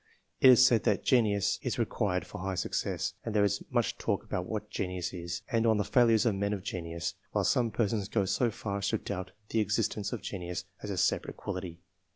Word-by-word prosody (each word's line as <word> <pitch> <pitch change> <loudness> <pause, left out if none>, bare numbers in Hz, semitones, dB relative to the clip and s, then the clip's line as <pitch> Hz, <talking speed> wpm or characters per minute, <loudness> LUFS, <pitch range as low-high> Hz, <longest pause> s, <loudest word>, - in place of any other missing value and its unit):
It 130 - +8
is 130 0 +8
said 120 -4 +4
that 105 - +2
"genius" 105 -6 +2
is - - -2
required - - 0
for - - -9
high 95 +1 -2
success, - - -2
and 115 -2 -4
there 105 - +4
is 100 0 +1
much - - 0
talk - - -1
about 90 0 -3
what 105 -1 -4
genius 90 -3 -3
is, 85 -1 -5
and 115 -1 +2
on 110 -1 +4
the 105 - +1
failures 115 +1 +4
of 115 - +3
men 100 +1 -1
of 95 -3 -4
genius, 85 -3 -4 0.2
while - - +2
some 120 -2 +2
persons 105 -2 -1
go 100 -4 +1
so 120 +5 +1
far 100 -2 -4
as 100 - -1
to - - +1
doubt 95 -2 -5 0.2
the 115 - +1
existence 105 -1 0
of 120 - -5
genius 90 -1 -4 0.2
as 105 - -6
a 100 - -3
separate 95 - 0
quality. 90 -3 -5
100 Hz, 215 wpm, -30 LUFS, 95-110 Hz, 0.2 s, It